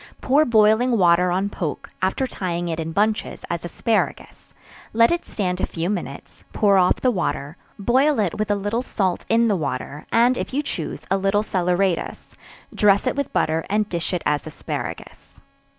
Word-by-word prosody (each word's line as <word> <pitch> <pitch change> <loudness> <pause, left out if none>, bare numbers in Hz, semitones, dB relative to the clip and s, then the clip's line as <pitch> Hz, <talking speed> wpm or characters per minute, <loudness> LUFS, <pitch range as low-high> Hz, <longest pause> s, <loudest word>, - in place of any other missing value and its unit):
Pour 285 +4 +3
boiling 225 +1 +4
water 180 -1 +4
on 190 +3 0
poke, 170 -6 -5
after 190 +8 0
tying 175 -7 -3
it 165 0 -3
in 165 0 -3
bunches, 210 +4 -1
as 170 -1 -3
asparagus, 220 +6 -2 0.4
let 230 +1 +5
it 345 0 -1
stand 185 -3 -2
a - - +2
few 170 +3 -2
minutes; 155 -8 -6
pour 200 -2 +4
off 180 - +4
the 255 - +1
water; 155 - -2 0.2
boil 260 +8 +2
it 200 -5 +1
with 215 0 -1
a 205 - +3
little 205 +4 -1
salt 190 -7 -2
in 230 +1 +4
the 210 - +2
water, 145 -2 -4
and 245 +2 +3
if - - -4
you 290 - +1
choose - - -5
a 195 - +3
little 195 +2 +1
salaeratus; 180 -2 -1 0.4
dress 200 +1 +3
it 255 - 0
with 280 0 -2
butter, 160 +1 0
and 210 0 0
dish 170 -2 -3
it 180 -2 -2
as 150 +1 0
asparagus. 155 - -7
195 Hz, 180 wpm, -22 LUFS, 175-225 Hz, 0.4 s, let